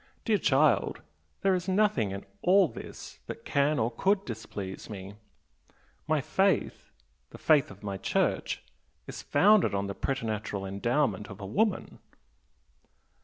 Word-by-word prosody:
Dear 215 -3 +2
child, 145 0 +2 0.4
there 195 -1 +4
is 185 +1 -1
nothing 190 - +2
in 100 +1 -6 0.2
all 190 +1 +5
this - - -10
that - - -8
can 145 +2 +2
or 115 -1 +1
could 195 - +1
displease 105 -5 -7
me! 100 -2 -7 0.9
My 155 -2 +2
faith 190 +7 0 0.4
the - - -11
faith 150 -4 +3
of 100 +1 -13
my 100 -1 -3
Church - - -1 0.4
is - - -7
founded 205 - +4
on 100 0 -1
the 100 - -4
preternatural 110 -5 -3
endowment 115 +4 0
of 100 0 -10
a 100 - -6
woman!" 200 - -1
130 Hz, 135 wpm, -29 LUFS, -, 0.9 s, all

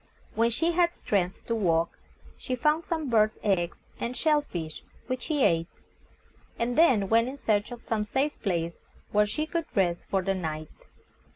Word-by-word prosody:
When 230 +1 +3
she 325 +9 +1
had 345 0 +2
strength 185 -3 -1
to 230 - -1
walk, 170 -6 +1 0.4
she 255 - -3
found 300 +6 +2
some 320 -4 -2
birds' 215 -3 +3
eggs 175 -4 +1 0.2
and 240 +2 -3
shell 305 -2 +3
fish, 165 - -6 0.2
which 255 0 -3
she 295 -4 0
ate, 165 0 +3 0.9
and 240 +1 -1
then 255 -12 +5
went 230 +3 +4
in 275 - -7
search 210 -4 0
of 240 -1 -8
some 220 -2 -1
safe 270 +8 0
place 170 -4 -1 0.4
where 210 0 +4
she 265 +9 -2
could 335 0 -2
rest 175 -4 +1
for 195 -1 +1
the 195 +1 +1
night. 155 -4 -4
225 Hz, 175 wpm, -28 LUFS, 185-280 Hz, 0.9 s, then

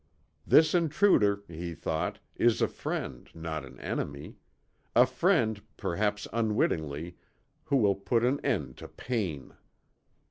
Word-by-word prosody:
This 155 0 +6
intruder, 150 - +3
he 85 0 -6
thought, 80 0 -2 0.2
is 120 -1 +3
a - - +3
friend, 60 -2 -5
not 80 -2 -4
an 65 -2 -12
enemy. 70 +1 -4 0.6
A - - +8
friend, 110 -2 +1 0.2
perhaps 105 +3 -1
unwittingly, 85 -8 -1 0.5
who 145 -3 +2
will 105 -5 +4
put 115 +4 +1
an 135 +3 +1
end 85 - -1
to - - -9
pain. 95 - -4
100 Hz, 120 wpm, -29 LUFS, 80-115 Hz, 0.6 s, A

